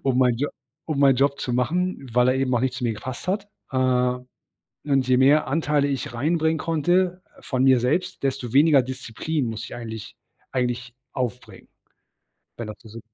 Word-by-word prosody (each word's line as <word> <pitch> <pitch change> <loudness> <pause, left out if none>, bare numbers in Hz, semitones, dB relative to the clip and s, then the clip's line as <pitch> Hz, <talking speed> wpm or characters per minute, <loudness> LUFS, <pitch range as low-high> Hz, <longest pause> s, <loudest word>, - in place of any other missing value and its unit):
um 130 -2 +1
mein 125 -2 +4
Jo 145 +4 -1 0.4
um 155 -3 -2
meinen 140 -2 +6
Job 140 +2 +2
zu 125 - -3
machen, 140 +5 -1
weil 125 +1 +4
er - - +2
eben 135 -1 0
auch - - +3
nicht 130 0 0
zu 130 - -6
mir 120 - +1
gepasst 130 +9 -7
hat. 200 +1 -1 0.2
Äh, 130 - -1 1.1
und 135 -3 +2
je 130 - +5
mehr 140 +3 +5
Anteile 145 -1 +1
ich 135 -3 -3
reinbringen 160 +5 +1
konnte 175 +4 +1 0.2
von 130 -1 0
mir 130 -2 +5
selbst, 140 +9 -1
desto 130 -4 -2
weniger 145 0 +6
Disziplin 130 +3 -3
muss 110 -2 -4
ich - - -8
eigentlich 110 -3 -7 0.4
eigentlich 125 -1 -2 0.2
aufbringen. 120 -5 -5 0.9
Wenn 115 -2 -6
er 105 - -6
versu 115 0 -11
130 Hz, 180 wpm, -24 LUFS, 125-150 Hz, 1.1 s, meinen